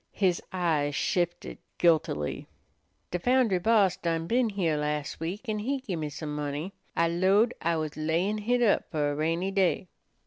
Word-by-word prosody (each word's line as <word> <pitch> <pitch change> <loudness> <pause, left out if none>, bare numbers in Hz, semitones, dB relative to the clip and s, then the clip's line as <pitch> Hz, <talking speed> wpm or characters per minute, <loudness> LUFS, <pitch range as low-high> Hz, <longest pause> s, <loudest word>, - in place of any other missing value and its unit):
His 185 -4 +2
eyes 155 -6 0
shifted 175 0 -1 0.2
guiltily. 155 - +1 0.6
"De 180 - -1
foundry 245 -3 +3
boss 200 -2 +3
done 165 -1 -1
been 235 +5 +2
heah 180 -6 0
las' 150 -1 -2
week, 185 +10 -5
an' 215 -1 -1
he 270 +6 -1
gimme 170 - -4
some 150 +1 -5
money. 150 +5 -3 0.2
I 170 - +3
'lowed 190 +7 +3
I 170 0 +1
was 155 -2 -3
layin' 170 +7 0
hit 245 +3 +1
up 215 - +2
fer 150 -3 0
a - - -3
rainy 165 +5 0
day." 190 -2 +1
175 Hz, 165 wpm, -28 LUFS, 155-205 Hz, 0.6 s, foundry